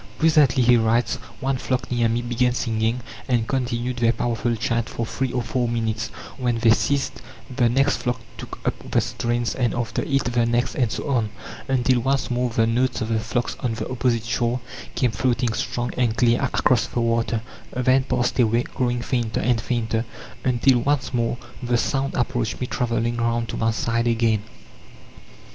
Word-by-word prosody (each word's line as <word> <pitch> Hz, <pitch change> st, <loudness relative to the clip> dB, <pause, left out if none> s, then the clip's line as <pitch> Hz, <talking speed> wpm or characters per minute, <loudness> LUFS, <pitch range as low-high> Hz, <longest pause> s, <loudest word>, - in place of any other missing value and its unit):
"Presently," 150 Hz, -5 st, +4 dB
he 120 Hz, 0 st, +6 dB
writes, 115 Hz, +1 st, +2 dB, 0.2 s
"one 135 Hz, 0 st, 0 dB
flock 125 Hz, 0 st, -2 dB
near 120 Hz, -2 st, +2 dB
me 120 Hz, +1 st, 0 dB
began 120 Hz, +1 st, +1 dB
singing, 115 Hz, 0 st, 0 dB, 0.3 s
and 120 Hz, -3 st, +1 dB
continued 125 Hz, -1 st, -1 dB
their 115 Hz, -1 st, +3 dB
powerful 120 Hz, 0 st, -1 dB
chant 115 Hz, 0 st, -1 dB
for 115 Hz, -, -3 dB
three 130 Hz, +3 st, -2 dB
or 125 Hz, -1 st, -1 dB
four 125 Hz, -2 st, -1 dB
minutes; 115 Hz, -1 st, -1 dB, 0.3 s
when 120 Hz, -2 st, +1 dB
they 115 Hz, 0 st, +4 dB
ceased 140 Hz, +4 st, +1 dB, 0.3 s
the 120 Hz, -3 st, +3 dB
next 135 Hz, +4 st, +2 dB
flock 125 Hz, -1 st, -2 dB, 0.2 s
took -, -, -8 dB
up -, -, +2 dB, 0.2 s
the -, -, +3 dB
strains, 120 Hz, 0 st, -1 dB
and 120 Hz, -3 st, 0 dB
after 115 Hz, -2 st, -2 dB
it 135 Hz, -1 st, +1 dB
the 120 Hz, -1 st, +1 dB
next, 120 Hz, +1 st, +1 dB
and 120 Hz, -4 st, 0 dB
so -, -, -4 dB
on, 120 Hz, -6 st, +1 dB, 0.4 s
until 130 Hz, -1 st, +2 dB
once 135 Hz, +2 st, 0 dB
more 125 Hz, 0 st, +1 dB
the 115 Hz, -1 st, +2 dB
notes 125 Hz, +3 st, +1 dB
of 110 Hz, -, -2 dB
the 115 Hz, -1 st, +1 dB
flocks 120 Hz, +2 st, -2 dB
on 120 Hz, -3 st, -1 dB
the 110 Hz, -1 st, -4 dB
opposite 120 Hz, -3 st, 0 dB
shore 120 Hz, +1 st, 0 dB, 0.4 s
came 125 Hz, -3 st, +2 dB
floating 120 Hz, +1 st, 0 dB
strong 120 Hz, +2 st, -2 dB
and 120 Hz, -2 st, +1 dB
clear 120 Hz, -1 st, +3 dB
across 125 Hz, -3 st, +2 dB
the -, -, -3 dB
water 115 Hz, -1 st, 0 dB, 0.3 s
then 130 Hz, +1 st, +3 dB
passed 125 Hz, -1 st, 0 dB
away, 115 Hz, 0 st, +3 dB
growing 120 Hz, -1 st, -2 dB
fainter 120 Hz, -3 st, -1 dB
and 120 Hz, -2 st, +1 dB
fainter, 115 Hz, -1 st, -1 dB, 0.4 s
until 125 Hz, 0 st, +3 dB
once 140 Hz, +1 st, 0 dB
more 120 Hz, 0 st, 0 dB, 0.2 s
the 120 Hz, -1 st, +1 dB
sound 135 Hz, +3 st, -1 dB
approached 120 Hz, -2 st, -1 dB
me 125 Hz, -, -1 dB
travelling 120 Hz, -1 st, -1 dB
round 115 Hz, 0 st, 0 dB
to -, -, -5 dB
my 115 Hz, -, +1 dB
side 115 Hz, +1 st, 0 dB
again." 115 Hz, -2 st, +2 dB
120 Hz, 180 wpm, -23 LUFS, 115-125 Hz, 0.4 s, he